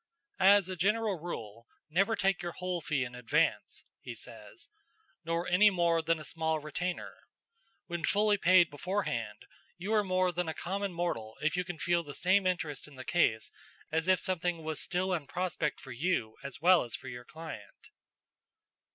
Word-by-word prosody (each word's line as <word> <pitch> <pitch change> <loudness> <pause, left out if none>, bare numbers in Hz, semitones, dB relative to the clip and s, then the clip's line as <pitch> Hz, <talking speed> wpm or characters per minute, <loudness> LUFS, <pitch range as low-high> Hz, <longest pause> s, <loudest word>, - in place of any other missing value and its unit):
"As 195 0 +6
a 185 - -4
general 205 +2 +1
rule, 115 -9 -7 0.2
never 195 +8 +2
take 195 -2 +1
your 175 -1 -4
whole 180 -1 -3
fee 145 -3 0
in 125 0 -6
advance," 125 -1 0
he - - -8
says, - - -10 0.6
"nor 165 +1 -1
any 195 +4 +6
more 170 -3 +2
than 165 +1 +1
a 155 - -8
small 160 0 -1
retainer. 165 +4 -4 0.7
When 170 -2 -5
fully 205 +3 +3
paid 180 -3 +5
beforehand, 185 +8 -3 0.3
you 195 +5 -3
are 210 -1 +4
more 185 -1 +2
than 175 -1 -2
a 160 - -4
common 195 +2 -2
mortal 170 -11 -3
if 155 +2 +2
you 180 - 0
can 180 -2 -6
feel 170 +2 +1
the 145 -4 -8
same 185 +1 +3
interest 160 -7 -2
in 150 - -14
the 130 0 -9
case 110 -1 +2 0.4
as 160 +2 0
if 185 -1 +4
something 175 -3 -1
was 155 -2 -3
still 185 0 -1
in 155 -6 -2
prospect 175 -5 -2
for 135 - -10
you 120 -5 -1
as 140 -1 -7
well 180 +2 +6
as 120 - -3
for - - -9
your 120 -1 -7
client." 160 +3 -10
175 Hz, 175 wpm, -31 LUFS, 155-185 Hz, 0.7 s, As